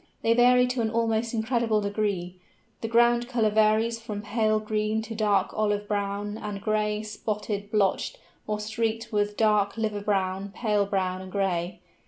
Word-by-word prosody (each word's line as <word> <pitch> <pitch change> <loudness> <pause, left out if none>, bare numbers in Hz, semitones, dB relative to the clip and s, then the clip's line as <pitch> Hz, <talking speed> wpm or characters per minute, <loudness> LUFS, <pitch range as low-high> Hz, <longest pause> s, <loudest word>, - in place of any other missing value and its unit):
They 225 - +4
vary 250 +1 +5
to 250 -1 -1
an 220 - 0
almost 225 0 0
incredible 225 -1 +1
degree. 200 -3 -2 0.5
The 225 - -2
ground 240 +1 +3
colour 225 -4 +2
varies 220 +2 +3
from 210 -2 -5
pale 215 0 +1
green 215 0 -1
to 225 - -7
dark 210 -2 +1
olive 205 -1 0
brown 205 +1 -2
and 205 -1 -5
gray, 210 +1 0
spotted, 210 -1 -4
blotched, 210 - +1 0.3
or 210 0 -1
streaked 225 +1 -2
with 205 0 0
dark 210 -2 +2
liver 215 -2 -1
brown, 195 -1 -1
pale 210 -4 +1
brown 185 -2 -1
and 190 0 -9
gray. 185 -3 -1
215 Hz, 160 wpm, -26 LUFS, 205-225 Hz, 0.5 s, vary